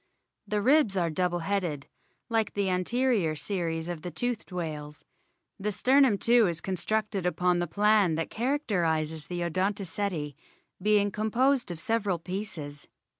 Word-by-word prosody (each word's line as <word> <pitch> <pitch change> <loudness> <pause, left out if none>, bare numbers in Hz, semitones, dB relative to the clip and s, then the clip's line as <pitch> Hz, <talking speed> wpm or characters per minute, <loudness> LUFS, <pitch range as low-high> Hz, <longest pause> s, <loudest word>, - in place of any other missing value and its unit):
The 210 0 -1
ribs 260 -6 +4
are 170 -2 +1
double 175 +1 0
headed, 175 -8 -1 0.4
like 225 -2 0
the 200 -2 +1
anterior 195 -2 +1
series 165 +1 -2
of 175 -3 -5
the 180 - -5
toothed 240 +5 -3
whales. 150 -4 -5 0.6
The 210 +2 -1
sternum 255 +1 +4
too 235 0 +4
is 170 -2 -1
con 190 - -4
structed 205 +2 -1
upon 180 0 +1
the 175 - -1
plan 205 -1 +3
that 165 0 -3
characterises 170 - -1
the 175 -1 -4
Odonto 190 +4 -1
ceti, 165 -5 -3 0.5
being 205 0 +3
composed 240 +5 +1
of 175 -2 -5
several 205 -1 0
pieces. 165 -5 -6
190 Hz, 145 wpm, -28 LUFS, 165-215 Hz, 0.6 s, ribs